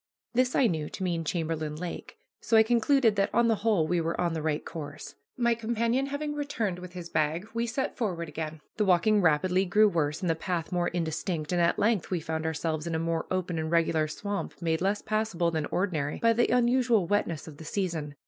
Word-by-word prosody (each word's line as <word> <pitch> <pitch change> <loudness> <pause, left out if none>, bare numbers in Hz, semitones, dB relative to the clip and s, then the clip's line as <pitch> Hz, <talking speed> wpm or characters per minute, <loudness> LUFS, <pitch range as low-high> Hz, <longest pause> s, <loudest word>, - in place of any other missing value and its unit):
This 255 +1 +2
I 270 - +4
knew 160 -8 0
to 190 - -6
mean 170 -3 -1
Chamberlain 160 -2 -2
Lake. 170 +2 -7 0.2
So 225 - +2
I 220 - +8
concluded 240 0 +3
that 195 - +2
on 235 0 +4
the 225 - +2
whole 205 -7 +2
we 175 0 +1
were 165 +1 -2
on 175 -2 +1
the 160 - -2
right 150 -1 -1
course. 150 -2 -7 0.2
My 235 -1 +3
companion 235 +3 0
having 295 +1 -3
returned 235 -11 -2
with 180 0 -9
his 175 -2 -7
bag, 160 +5 0
we 230 +1 -1
set 250 +4 -2
forward 180 -8 -2
again. 155 0 -5 0.2
The 210 - +2
walking 200 +3 +4
rapidly 180 +3 +3
grew 210 +4 +4
worse 160 -4 0
and 185 - -1
the 165 - +3
path 165 0 -3
more 175 -1 +1
indistinct, 165 -1 -2
and 175 -1 +2
at 170 - +2
length 210 -4 +1
we 180 - 0
found 160 0 -3
ourselves 160 0 -2
in 165 - -1
a - - +1
more 165 0 -1
open 180 -3 -1
and 160 0 -2
regular 165 -2 +2
swamp 200 +6 -4
made 165 -1 0
less 200 +2 0
passable 215 -6 0
than 155 -2 -1
ordinary 160 -7 -1
by 230 0 +3
the 240 +1 +2
unusual 240 -4 +3
wetness 170 -5 -1
of 150 -3 -10
the 160 - -10
season. 160 -5 -3
175 Hz, 215 wpm, -28 LUFS, 160-220 Hz, 0.2 s, I